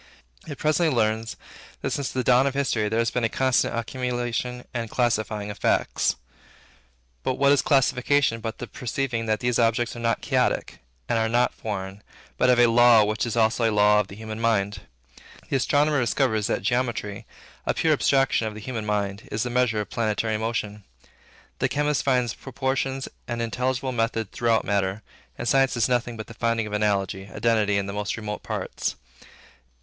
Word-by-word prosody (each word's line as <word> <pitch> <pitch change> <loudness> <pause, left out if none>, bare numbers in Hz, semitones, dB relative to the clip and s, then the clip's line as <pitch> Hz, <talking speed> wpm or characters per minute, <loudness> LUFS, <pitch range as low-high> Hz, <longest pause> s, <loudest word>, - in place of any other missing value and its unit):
It 145 -3 -6
presently 155 +2 +2
learns, 110 0 0 0.5
that, - - -1
since 140 -2 -2
the 130 - -1
dawn 125 +3 +4
of 135 - -2
history, 120 -6 0
there 110 - -1
has 115 0 +1
been 125 - -1
a 115 - +2
constant 130 -2 +1
accumulation 125 0 -3
and 115 -2 -3
classifying 110 -4 -1
of 105 - -10
facts. - - +1 1.1
But 130 - -1
what 140 +1 +4
is 140 -3 +4
classification 135 -2 +2
but 110 0 -4
the - - -5
perceiving 120 -2 -3
that 110 0 0
these 120 -1 +1
objects 115 +1 +1
are - - -7
not 115 0 0
chaotic, - - 0 0.3
and 115 - +1
are 110 0 +1
not 120 +2 +2
foreign, 100 -2 -5 0.4
but 125 - +4
have 125 - +5
a 120 - +7
law 120 -1 +6
which 105 +3 -1
is 115 - -3
also 115 +1 +3
a - - -1
law 105 0 +5
of 105 - 0
the 100 - -10
human 110 0 -7
mind? 100 -4 +1 0.7
The 135 - +2
astronomer 145 +3 +2
discovers 115 -3 +1
that - - -1
geometry, 120 -3 -2 0.4
a - - +1
pure 160 -1 +3
abstraction 135 -5 +2
of 105 - -6
the - - -7
human 110 -1 -5
mind, 100 -1 -2
is 110 +1 -1
the 125 - -3
measure 120 -3 +1
of 105 - -8
planetary 110 0 0
motion. 105 -2 -3 0.8
The - - +1
chemist 145 -2 +1
finds 125 -4 +1
proportions 135 0 -2 0.2
and 120 -1 -3
intelligible 125 +3 -1
method 115 -3 -1
throughout 115 -2 +1
matter; 100 0 -1 0.3
and - - -4
science 135 -2 +3
is 115 - +3
nothing 120 -2 -1
but 110 - -6
the - - -11
finding 115 0 0
of 105 - -7
analogy, 100 -2 -1
identity, 105 0 +1
in 100 - -1
the 100 - -5
most 105 +2 -3
remote 105 -2 -5
parts. - - -3
115 Hz, 185 wpm, -25 LUFS, 105-125 Hz, 1.1 s, a